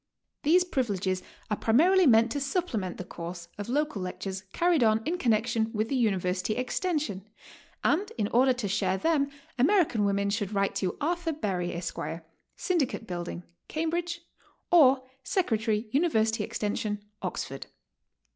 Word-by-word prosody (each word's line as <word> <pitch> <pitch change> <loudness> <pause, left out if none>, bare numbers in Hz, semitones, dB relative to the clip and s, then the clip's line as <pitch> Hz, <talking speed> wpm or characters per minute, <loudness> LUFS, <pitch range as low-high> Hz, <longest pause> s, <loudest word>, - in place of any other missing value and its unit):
These 345 +5 +5
privileges 200 - -1 0.3
are 210 - +1
primarily 340 +10 +4
meant 230 -1 +5
to 285 - -1
supplement 275 - -2
the - - -5
course 170 0 -7
of 205 - -5
local 295 -5 0
lectures 190 +1 -4
carried 340 -6 +3
on 220 0 +3
in 350 +2 -1
connection 225 -3 +1
with 215 +1 -1
the 275 - 0
University 195 -3 0
Extension, 250 - -2 0.5
and 390 +8 +1
in 205 - +1
order 260 +3 +4
to 245 -4 -2
share 190 -1 +1
them 295 +1 +1 0.3
American 295 - +3
women 200 0 +1
should 205 -1 -2
write 195 0 +1
to 185 -2 -2
Arthur 340 +1 -1
Berry, 185 - -2
Esq., 170 0 -5 0.6
Syndicate 320 - -1
Building, 175 - -5 0.2
Cambridge, 340 +2 -2 0.5
or 275 -6 +6 0.2
Secretary, 225 - 0
University 225 -8 +2
Extension, 210 0 -2 0.2
Oxford. 135 -7 -4
225 Hz, 135 wpm, -28 LUFS, 200-305 Hz, 0.6 s, or